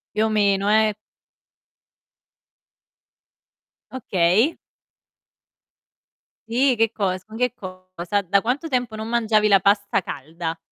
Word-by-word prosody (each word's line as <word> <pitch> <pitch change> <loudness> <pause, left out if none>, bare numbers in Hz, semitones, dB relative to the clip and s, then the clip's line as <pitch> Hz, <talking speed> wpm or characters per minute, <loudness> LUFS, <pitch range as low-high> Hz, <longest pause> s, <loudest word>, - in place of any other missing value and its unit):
Più 215 - +2
o - - +1
meno, 200 -2 +1
eh. 215 0 +3 3.0
Okay. 215 - +1 1.9
Sì, 255 +1 +2
che 225 0 +1
cosa? 185 -4 -2
Ma 220 - -10
che 250 +1 0
cosa? 185 -1 -5
Da 200 +2 +2
quanto 255 +9 -2
tempo 245 -5 -2
non 220 0 -6
mangiavi 220 -2 +2
la 195 -2 +5
pasta 200 +1 +1
calda? 165 +1 -6
210 Hz, 105 wpm, -22 LUFS, 185-225 Hz, 3.0 s, la